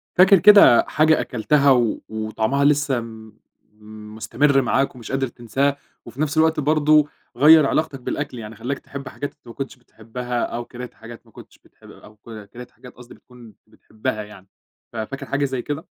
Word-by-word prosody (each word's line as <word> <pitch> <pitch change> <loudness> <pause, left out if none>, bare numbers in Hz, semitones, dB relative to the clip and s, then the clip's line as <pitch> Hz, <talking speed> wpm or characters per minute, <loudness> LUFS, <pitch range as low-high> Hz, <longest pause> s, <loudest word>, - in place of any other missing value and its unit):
فاكر 185 +1 +6
كده 205 - +7
حاجة 155 +1 +2
أكلتها 140 +4 +1
و 120 -4 +1
وطعمها 110 +5 -1
لسه 145 -3 +2
م 110 -2 -11 0.8
مُستمِر 135 +6 +1
معاك 135 +2 0
ومش 120 -3 -10
قادر 135 0 -1
تنساها 135 +4 -2 0.3
وفي 120 +5 -8
نفس 155 0 -2
الوقت 160 0 +2
برضه 150 0 +3 0.3
غيّر 155 +2 +7
علاقتك 140 -1 -1
بالأكل، 130 0 -5
يعني 110 0 -9
خلّاك 130 +5 -5
تحب 140 -1 -10
حاجات 145 +2 -6
أنت - - -27
ما 115 - -10
كنتش 135 -1 -6
بتحبّها 120 0 -6
أو 120 0 -5
كانت 125 +1 -10
حاجات 115 0 -13
ما - - -23
كنتش - - -16
بتح - - -29
أو 105 - -16
ك 110 -1 -12
كانت 125 +3 -12
حاجات 125 - -15
قصدي 125 0 -15
بتكُون 120 -3 -17
بتحبّها 110 +1 -6
يعني، 105 -2 -15 0.5
ففاكر 115 +5 -6
حاجة 140 +1 -1
زي 130 -2 -3
كده؟ 145 +5 -6
125 Hz, 175 wpm, -21 LUFS, 115-145 Hz, 0.8 s, كده